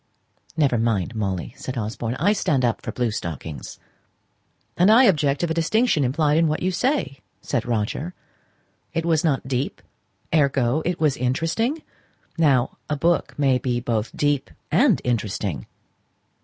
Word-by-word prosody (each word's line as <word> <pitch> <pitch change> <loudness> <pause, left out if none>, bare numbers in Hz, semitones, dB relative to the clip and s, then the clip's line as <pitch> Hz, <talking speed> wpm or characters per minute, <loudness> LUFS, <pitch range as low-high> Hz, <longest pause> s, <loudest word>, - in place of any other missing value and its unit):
"Never 135 -6 +2
mind, 115 -3 0
Molly," 95 -5 -3
said 130 0 -6
Osborne. 115 +2 -3
"I 190 +9 +2
stand 140 -10 +1
up 115 - 0
for - - -5
blue 120 -3 -1
stockings." 80 -6 -6 1.0
"And 180 +3 +4
I 230 +4 +7
object 145 - +3
to - - +2
the 160 - -1
distinction 170 - +2
implied 145 +4 +2
in 165 - +3
what 155 +2 -1
you 185 - +1
say," 215 - -1 0.2
said 115 - -2
Roger. 120 +9 -2 0.8
"It 165 0 0
was 160 -2 +2
not 140 -5 0
deep, 130 +1 -2 0.5
ergo, 140 -2 +2
it 175 0 -1
was 150 -4 +2
very 125 - 0
interesting. 225 - -1 0.5
Now, 140 -7 +2
a 150 - 0
book 170 +4 0
may 135 -3 +3
be 125 -1 -1
both 115 -2 -1
deep 145 -2 +1 0.2
and - - +4
interesting." 105 - -2
140 Hz, 155 wpm, -23 LUFS, 120-165 Hz, 1.0 s, I